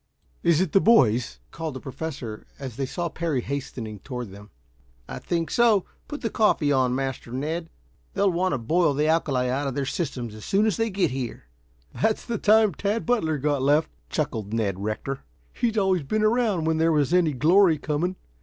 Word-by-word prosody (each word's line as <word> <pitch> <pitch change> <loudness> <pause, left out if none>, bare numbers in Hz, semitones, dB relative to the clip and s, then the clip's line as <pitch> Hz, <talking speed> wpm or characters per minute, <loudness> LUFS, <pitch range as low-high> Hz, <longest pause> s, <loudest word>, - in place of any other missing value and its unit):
"Is 170 0 +3
it 185 -5 0
the 195 - +4
boys?" 125 - +3
called 160 -4 -5
the - - -5
Professor, 130 -5 -6
as 130 -5 -7
they 135 +1 -2
saw 175 +5 -3
Parry 165 -5 -2
hastening 120 -5 -5
toward 125 -5 -6
them. 100 +2 -12 0.6
"I - - -6
think 165 -3 -2
so. 225 -5 +4 0.2
Put 295 - -6
the 225 - -2
coffee 165 -9 +2
on, 130 -2 +2
Master 135 -3 -4
Ned. 160 +6 -3 0.5
They'll 200 -1 +3
want 180 +2 0
to - - +1
boil 150 +5 +1
the 150 +2 +1
alkali 140 -6 +1
out 135 +3 -1
of 135 - -3
their 140 - -1
systems 130 - -3
as 110 -1 -10
soon 200 +2 +2
as 215 -5 +1
they 225 0 0
get 190 -8 0
here." 130 -3 -5 0.5
"That's 220 0 0
the 235 -3 -3
time 215 -2 +4
Tad 205 +7 -2
Butler 210 -11 +1
got 145 0 0
left," 145 +4 +2 0.2
chuckled 110 -9 -2
Ned 100 -5 -1
Rector. 115 +6 -3 0.3
"He's 230 -2 -1
always 190 -3 +2
been 215 +10 -1
around 215 -6 +2
when 160 0 +1
there 165 +1 +3
was 150 0 +1
any 170 -4 +3
glory 165 +5 +4
coming. 155 +5 -2
155 Hz, 190 wpm, -25 LUFS, 130-190 Hz, 0.6 s, the